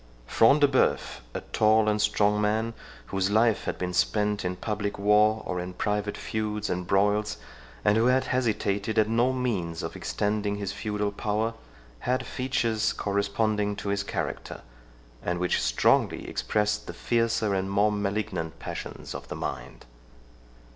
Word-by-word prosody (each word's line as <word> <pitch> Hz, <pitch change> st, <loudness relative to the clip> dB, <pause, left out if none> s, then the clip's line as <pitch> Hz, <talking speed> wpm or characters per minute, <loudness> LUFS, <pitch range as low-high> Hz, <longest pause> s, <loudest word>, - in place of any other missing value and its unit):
Front 115 Hz, -, +4 dB
de 145 Hz, -, +7 dB
Bœuf, 130 Hz, -2 st, +1 dB, 0.2 s
a -, -, -2 dB
tall 110 Hz, 0 st, +4 dB
and 105 Hz, 0 st, +2 dB
strong 105 Hz, 0 st, +2 dB
man, 110 Hz, +2 st, 0 dB, 0.4 s
whose 95 Hz, 0 st, +1 dB
life 110 Hz, +1 st, +3 dB
had -, -, -2 dB
been 90 Hz, 0 st, -3 dB
spent 105 Hz, +2 st, +1 dB
in 90 Hz, 0 st, -2 dB
public 105 Hz, 0 st, -3 dB
war 105 Hz, +2 st, +4 dB
or 90 Hz, -, -2 dB
in 90 Hz, +1 st, -6 dB
private 105 Hz, +1 st, -1 dB
feuds 105 Hz, -1 st, -3 dB
and 90 Hz, 0 st, -3 dB
broils, 105 Hz, +2 st, +2 dB, 0.5 s
and 105 Hz, +1 st, +4 dB
who 115 Hz, +2 st, +4 dB
had 130 Hz, +1 st, +4 dB
hesitated 110 Hz, -4 st, 0 dB
at 110 Hz, -1 st, +4 dB
no 120 Hz, +3 st, +2 dB
means 105 Hz, -11 st, -2 dB
of -, -, -5 dB
extending 105 Hz, 0 st, -1 dB
his 100 Hz, -1 st, -4 dB
feudal 105 Hz, -1 st, -2 dB
power, 105 Hz, +2 st, -1 dB, 0.5 s
had 130 Hz, -, -1 dB
features 115 Hz, -4 st, 0 dB
corresponding 105 Hz, +1 st, 0 dB
to 100 Hz, -, -5 dB
his 100 Hz, 0 st, 0 dB
character, 100 Hz, -, -4 dB, 0.6 s
and 90 Hz, 0 st, -1 dB
which 90 Hz, 0 st, +1 dB
strongly -, -, +2 dB
expressed 105 Hz, 0 st, -1 dB
the -, -, -5 dB
fiercer 115 Hz, -3 st, +1 dB
and 95 Hz, 0 st, -1 dB
more 100 Hz, +2 st, +3 dB
malignant 100 Hz, -5 st, -2 dB
passions -, -, -7 dB
of -, -, -7 dB
the -, -, -5 dB
mind. -, -, -6 dB
105 Hz, 155 wpm, -27 LUFS, 100-110 Hz, 0.6 s, de